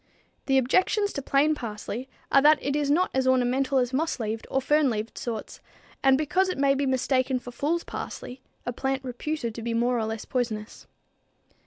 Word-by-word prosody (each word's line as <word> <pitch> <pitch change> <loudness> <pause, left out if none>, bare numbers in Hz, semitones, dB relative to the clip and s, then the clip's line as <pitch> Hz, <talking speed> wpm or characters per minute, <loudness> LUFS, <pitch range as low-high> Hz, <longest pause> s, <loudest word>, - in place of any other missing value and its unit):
The 270 -1 +4
objections 370 - +2
to 280 - -3
plain 280 +3 +3
parsley 235 0 -5 0.2
are 275 - +6
that 300 +2 +6
it 280 0 -2
is 295 -1 0
not 345 +6 +2
as 260 0 +1
ornamental 260 +1 +2
as 250 0 +1
moss 310 +1 0
leaved 220 0 -3
or 270 - +1
fern 295 +1 +3
leaved 220 -1 -3
sorts, 225 -3 -5 0.4
and 270 -1 +5
because 365 +6 +1
it 370 - -3
may 275 0 +4
be 275 0 0
mistaken 260 0 +1
for 245 0 -8
fools 305 +7 -1
parsley, 255 +1 -7 0.2
a 245 - -2
plant 270 +2 -2
reputed 250 -1 -3
to 230 - -7
be 230 0 -2
more 240 +1 +2
or 220 - 0
less 220 0 -4
poisonous. 230 -4 -3
265 Hz, 190 wpm, -26 LUFS, 240-285 Hz, 0.4 s, are